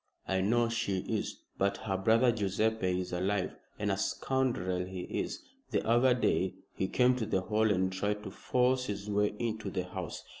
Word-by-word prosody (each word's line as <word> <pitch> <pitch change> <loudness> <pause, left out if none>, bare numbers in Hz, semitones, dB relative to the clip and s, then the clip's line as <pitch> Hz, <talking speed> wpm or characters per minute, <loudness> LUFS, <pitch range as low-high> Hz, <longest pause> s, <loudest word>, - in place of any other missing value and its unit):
"I 95 -1 +1
know 115 +4 +3
she 100 -5 -1
is. - - -3 0.2
But 100 0 +2
her 95 -3 -2
brother 115 +6 +4
Guiseppe 100 -3 0
is 90 - -6
alive, 95 +2 0 0.2
and 105 -1 0
a 95 - 0
scoundrel 100 -6 0
he 95 0 -6
is. - - -3 0.3
The - - 0
other 120 +2 +5
day 95 -6 +1 0.2
he 95 - -1
came 125 +4 +4
to 115 - -1
the 95 - +1
Hall 110 +3 +2
and 95 -2 +1
tried 105 +2 -1
to 95 - -6
force 125 +4 +1
his 100 -2 -4
way 105 0 +2
into 110 -3 -2
the 90 -1 -2
house. 90 -2 -6
100 Hz, 185 wpm, -31 LUFS, 95-115 Hz, 0.3 s, other